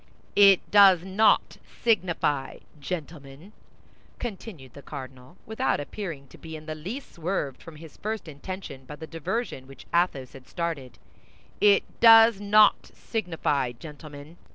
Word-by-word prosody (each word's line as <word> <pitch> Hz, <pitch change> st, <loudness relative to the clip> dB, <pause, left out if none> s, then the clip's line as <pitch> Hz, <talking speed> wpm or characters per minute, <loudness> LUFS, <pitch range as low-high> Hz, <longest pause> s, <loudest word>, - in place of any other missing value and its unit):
"It 200 Hz, -2 st, +7 dB
does 195 Hz, -4 st, +7 dB
not 195 Hz, +3 st, +2 dB, 0.3 s
signify, 175 Hz, -, 0 dB, 0.2 s
gentlemen," 150 Hz, +2 st, -8 dB, 0.6 s
continued 190 Hz, -, -8 dB
the 140 Hz, -, -12 dB
cardinal, 130 Hz, +2 st, -10 dB
without 220 Hz, -, -1 dB
appearing 150 Hz, -3 st, -7 dB
to -, -, -16 dB
be 160 Hz, -1 st, -9 dB
in 155 Hz, 0 st, -10 dB
the 155 Hz, -, -5 dB
least 195 Hz, -, -7 dB
swerved 165 Hz, -6 st, -3 dB
from 165 Hz, -, -12 dB
his 155 Hz, 0 st, -13 dB
first 215 Hz, -3 st, -5 dB
intention 155 Hz, -2 st, -8 dB
by 150 Hz, -, -9 dB
the 160 Hz, -, -9 dB
diversion 165 Hz, -, -4 dB
which 135 Hz, -, -14 dB
Athos 170 Hz, -7 st, 0 dB
had 135 Hz, -1 st, -14 dB
started, 165 Hz, -8 st, -5 dB, 0.6 s
"it 205 Hz, -1 st, +5 dB, 0.2 s
does 225 Hz, -2 st, +7 dB
not 210 Hz, +1 st, +4 dB
signify, 165 Hz, -, -2 dB
gentlemen. 150 Hz, +3 st, -12 dB
165 Hz, 130 wpm, -26 LUFS, 145-200 Hz, 0.6 s, It